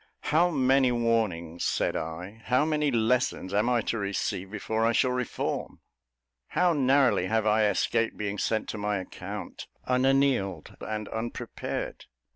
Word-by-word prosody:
"How 170 +3 +5
many 135 -4 +3
warnings," 110 -9 0
said - - 0
I, 90 +7 -5
"how 130 +4 +3
many 150 -2 +1
lessons 120 -4 +1
am 105 +4 +2
I 120 -2 +2
to 115 - -2
receive 100 -1 -2
before 110 +2 -2
I 115 +1 +3
shall 125 +3 +3
reform? 125 -1 -3 0.7
How 180 -1 +2
narrowly 135 - +3
have 110 +1 +1
I 110 0 +4
escaped 115 +2 0
being 105 -1 -3
sent 110 - 0
to 110 - -4
my 105 0 0
account 95 - -7 0.2
'unanealed' 130 -6 +1
and 105 -1 -4
unprepared! 115 +1 -5
115 Hz, 140 wpm, -28 LUFS, 105-130 Hz, 0.7 s, How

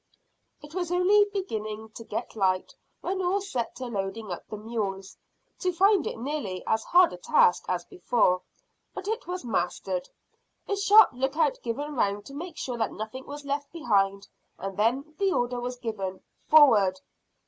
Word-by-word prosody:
It 295 +1 -12
was 355 -1 -2
only 385 +4 +5
beginning 220 - -4
to 230 - -9
get 225 +2 -5
light 185 -3 +1 0.3
when 380 +1 -2
all 370 +2 +1
set 260 -12 -4
to 255 - -6
loading 200 -2 -4
up 175 - -6
the 215 - -6
mules, 205 -3 -4 0.4
to 365 - +1
find 385 0 +3
it - - -4
nearly 235 -7 -4
as 220 0 +1
hard 355 0 +5
a - - -7
task 175 0 +3
as 180 -1 -1
before; 180 -1 +1 0.5
but 380 - -6
it 450 +3 -2
was 360 -6 -4
mastered, - - -2 0.6
a 405 - 0
sharp 405 +2 +7
lookout 270 +4 0
given 285 +6 -3
round 205 -3 0
to 275 - -11
make 330 +3 -7
sure 245 -2 -4
that 220 - 0
nothing 220 +5 -7
was 290 0 -8
left 280 0 -3
behind, 200 -10 +1 0.3
and 195 0 -5
then 250 +9 0
the 395 -1 +2
order 245 -6 0
was 250 +1 -4
given, 195 -6 -4 0.2
"Forward!" 210 -12 +6
245 Hz, 170 wpm, -27 LUFS, 210-345 Hz, 0.6 s, sharp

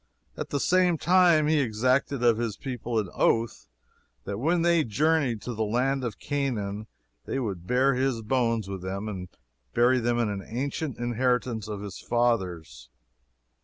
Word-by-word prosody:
At - - -5
the 140 - -1
same 180 +1 +3
time 175 -2 +4
he 155 0 +3
exacted 130 +2 +1
of 115 -2 +4
his 115 -3 -2
people 120 -3 -4
an 105 -3 0
oath 115 -1 +1 0.6
that 100 0 -5
when 165 +6 +1
they 170 -2 +4
journeyed 135 -1 +1
to 125 - -4
the 110 0 -1
land 130 +5 0
of 120 -4 -4
Canaan 110 -8 -3 0.4
they - - -3
would 95 -9 -4
bear 130 +4 +3
his 130 -3 0
bones 115 -3 0
with 95 -2 -5
them 95 +3 -4
and 95 -3 -5 0.5
bury 125 +2 +4
them 120 0 0
in 105 -4 -1
the 95 - -11
ancient 140 +3 -3
inheritance 120 -2 -1
of 105 -2 -5
his 100 -3 -7
fathers. 95 - -1
120 Hz, 165 wpm, -27 LUFS, 105-135 Hz, 0.6 s, time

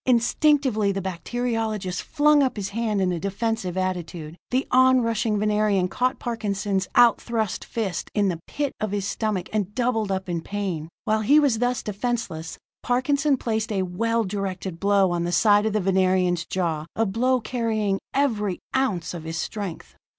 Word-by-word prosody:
Instinctively 250 -3 +3
the 195 - -2
bacteriologist 215 0 -2
flung 300 -1 +3
up 260 -4 0
his 195 -1 -3
hand 215 -2 -1
in 185 -1 +2
a 175 - -2
defensive 200 0 -2
attitude. 175 -4 -3
The 260 +2 +1
onrushing 235 -4 +3
Venerian 210 -3 +2
caught 255 +5 0
Parkinson's 200 -5 -2
out 240 -1 +6
thrust 220 -5 -2
fist 205 -7 -3
in 205 -2 +3
the 175 -3 -1
pit 290 -2 -2
of 215 - 0
his 200 -1 -2
stomach, 210 -5 -2
and 205 -1 -1
doubled 235 -5 0
up 190 0 -2
in 170 -2 -2
pain. 185 -5 -4 0.2
While 215 0 +1
he 285 +8 +5
was 270 -7 +2
thus 245 0 0
defenseless, 210 -7 -3 0.2
Parkinson 275 +3 +1
placed 220 -2 -2
a 195 -2 0
well 230 +6 0
directed 190 -3 -4
blow 200 -1 +3
on 170 -1 0
the 175 - -1
side 205 +5 +4
of 215 - -1
the 215 - +2
Venerian's 185 -2 +2
jaw, 165 -4 -2
a 225 - +2
blow 250 +6 +1
carrying 220 -4 -1
every 215 -9 0 0.2
ounce 195 -11 0
of 170 -3 -6
his 160 0 -4
strength. 195 -1 -5
210 Hz, 165 wpm, -24 LUFS, 185-235 Hz, 0.2 s, out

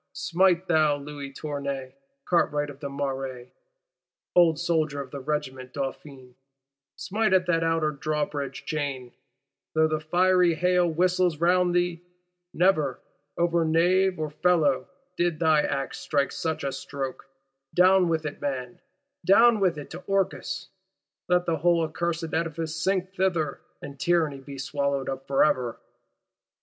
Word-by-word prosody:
Smite, 180 +1 +2
thou 155 -3 +3
Louis 145 -1 -8
Tournay, 140 -2 -5 0.3
cartwright 145 -4 +1
of 140 - -15
the 140 - -5
Marais, 135 -3 -4 0.8
old 170 -3 +5
soldier 160 -4 0
of 135 -2 -7
the 140 - -6
Regiment 130 -3 -4
Dauphine; 135 -2 -6 0.6
smite 215 0 0
at 185 -1 +4
that 165 -2 +1
Outer 165 -2 +1
Drawbridge 145 -2 -3
chain, 140 -5 -3 0.6
though 160 0 +4
the 155 0 -1
fiery 180 +2 +3
hail 180 +1 +2
whistles 180 0 +1
round 175 +2 +2
thee! 175 -1 0 0.5
Never, 155 -7 +2 0.4
over 170 0 +2
nave 180 +4 +3
or 155 -1 -3
felloe, 155 -5 +2 0.3
did 175 -2 +1
thy 160 -2 +4
axe 135 -2 -3
strike 140 -2 0
such 160 -1 -3
a 140 - -1
stroke. 135 0 -6 0.4
Down 185 0 +5
with 160 -1 -1
it, 150 - -5
man; 130 -3 -4 0.4
down 230 +3 +6
with 180 -5 +2
it 145 - -8
to 175 +3 -8
Orcus: 195 -1 -1 0.6
let 180 0 +3
the 165 -2 0
whole 170 +2 +3
accursed 165 0 -3
Edifice 160 -1 -2
sink 185 +2 0
thither, 175 -6 -1 0.2
and 140 -1 -9
Tyranny 160 -5 +1
be 140 +1 -10
swallowed 140 0 -2
up 135 0 -5
for 135 - +3
ever! 125 -5 0
155 Hz, 140 wpm, -26 LUFS, 140-175 Hz, 0.8 s, down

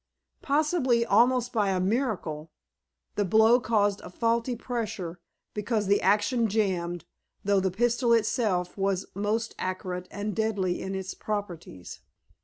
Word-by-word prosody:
Possibly, 285 -5 +2
almost 245 +3 +3
by 210 -4 +2
a 190 -1 +1
miracle, 185 - -1 0.6
the 205 - 0
blow 220 +5 +5
caused 205 -4 +1
a - - -9
faulty 230 +5 0
pressure, 220 -8 -4 0.3
because 210 0 -1
the 200 +1 +3
action 210 +4 +2
jammed, 185 -5 -1 0.4
though 200 0 +3
the 190 0 +1
pistol 240 +5 +1
itself 215 -5 +1
was 195 -1 0
most 215 +3 -1
accurate 185 -1 -4
and 205 0 -4
deadly 205 -5 0
in 190 0 -4
its 190 0 -4
properties. 175 - -6
205 Hz, 130 wpm, -27 LUFS, 185-230 Hz, 0.6 s, blow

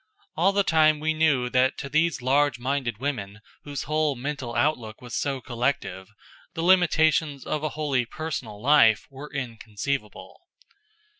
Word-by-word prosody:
All 180 +5 +3
the 200 0 +2
time 155 -3 +4
we 160 +1 0
knew 155 -6 +2
that 130 +1 +2
to - - -5
these 155 -1 +1
large 140 0 +2
minded 125 -3 -2
women 110 -6 -4 0.3
whose 145 -1 -4
whole 155 -2 0
mental 130 -2 -5
outlook 120 -4 0
was 125 -1 -11
so 140 -2 -1
collective, 115 -6 -3 0.5
the 165 - -2
limitations 160 -5 +3
of 155 - -2
a 155 - 0
wholly 140 -5 0
personal 130 -9 -5
life 115 -4 +5
were 140 +2 -10
inconceivable. 120 -2 -5
140 Hz, 145 wpm, -25 LUFS, 120-155 Hz, 0.5 s, life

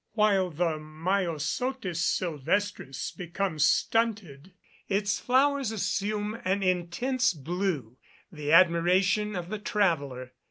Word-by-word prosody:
While 205 -4 +3
the 165 -1 -1
Myosotis 170 - -2
silvestris 170 -3 -1
becomes 175 -3 -1
stunted, 195 -8 0 0.4
its 200 0 0
flowers 270 -1 +2
assume 210 +1 -2
an 195 +2 0
intense 185 +6 0
blue 155 - -3 0.3
the 150 -3 -4
admiration 185 +4 +4
of 175 -1 -5
the 215 +1 -4
traveller. 145 -12 -1
185 Hz, 95 wpm, -28 LUFS, 160-210 Hz, 0.4 s, admiration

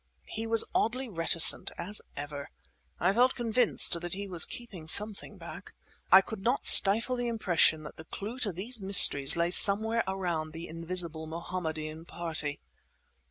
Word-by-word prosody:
He 225 +1 -7
was 225 0 +3
oddly 255 +3 -3
reticent, 165 -4 +4
as 195 +5 +2 0.2
ever. 145 0 -9 0.5
I 180 +3 -1
felt 250 +4 0
convinced 230 -7 0
that 175 +1 -6
he 200 +1 -8
was 175 -4 +4
keeping 195 -10 -9
something 210 +4 +1
back. - - -13 0.4
I 190 - +6
could 220 +1 -10
not 245 +7 -3
stifle 225 +6 +5
the 245 -1 -5
impression 175 -8 -1
that 150 - -13
the 160 - -13
clue 220 +9 -9
to 210 -5 -4
these 210 +6 -6
mysteries 170 -8 +4
lay 170 +1 -2
somewhere 220 +5 +3
around 175 -5 -6
the 165 +1 -9
invisible 165 -1 -6
Mohammedan 160 -1 -8
party. 155 -4 -6
185 Hz, 155 wpm, -26 LUFS, 165-220 Hz, 0.5 s, I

